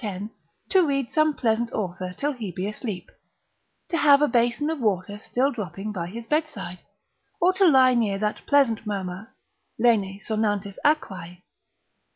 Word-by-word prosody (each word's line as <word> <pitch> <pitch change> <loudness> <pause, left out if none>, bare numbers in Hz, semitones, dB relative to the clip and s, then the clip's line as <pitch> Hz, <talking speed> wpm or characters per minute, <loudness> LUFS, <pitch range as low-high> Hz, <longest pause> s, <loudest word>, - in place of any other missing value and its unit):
to 380 - +4
read 275 -5 -1
some 310 0 +3
pleasant 235 -4 0
author 185 -2 -3
till 290 +1 0
he 235 -7 -6
be 185 +3 -3
asleep, 210 -3 -6 0.8
to - - -2
have 285 -3 +6
a 295 - +3
basin 240 +3 +1
of 320 - -4
water 205 -2 -1
still 260 +5 0
dropping 210 - -5
by 175 -4 -4
his 230 +5 -8
bedside, 230 - -2 0.6
or 365 +2 +4
to 380 0 +4
lie 260 -4 +6
near 220 -5 +1
that 210 +1 -2
pleasant 270 -6 +3
murmur, 195 0 -4 0.5
lene 210 -5 +2
sonantis 205 -2 -2
aquae. 185 - -1
225 Hz, 150 wpm, -25 LUFS, 195-280 Hz, 0.8 s, have